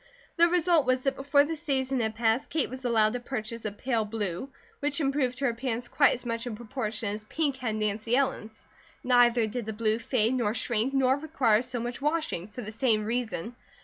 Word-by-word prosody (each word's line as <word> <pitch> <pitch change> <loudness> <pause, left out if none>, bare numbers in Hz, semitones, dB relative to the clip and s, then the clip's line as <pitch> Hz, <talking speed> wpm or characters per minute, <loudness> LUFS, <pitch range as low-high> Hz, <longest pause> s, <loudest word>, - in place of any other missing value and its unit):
The 340 +1 +6
result 340 -4 +3
was 255 0 +2
that 270 0 0
before 285 +1 +3
the 325 +3 -3
season 270 -4 -1
had 220 -1 -1
passed 230 +4 +1
Kate 310 -6 0
was 260 0 -7
allowed 220 -3 +3
to 245 - -2
purchase 230 -2 -5
a 215 - -1
pale 230 +2 -1
blue, 210 +1 -4 0.3
which 290 +1 -1
improved 270 -4 0
her 275 - 0
appearance 240 0 -3
quite 280 - +4
as 245 - -11
much 230 +1 -3
in 230 - -4
proportion 220 -2 -4
as 210 +1 -4
pink 285 +2 -1
had 235 -4 -2
Nancy 215 +2 0
Ellen's; 260 -5 -2 0.4
neither 245 -2 +4
did 220 +1 -4
the 220 - -3
blue 220 +1 0
fade 235 -1 +1
nor 235 -4 0
shrink 235 +2 +1
nor 265 0 +3
require 270 -8 +2
so 250 -1 -4
much 240 +2 -5
washing, 300 - -1
for 225 +4 -8
the 215 - -6
same 220 -2 +1
reason. 230 -2 -3
245 Hz, 205 wpm, -28 LUFS, 220-270 Hz, 0.4 s, The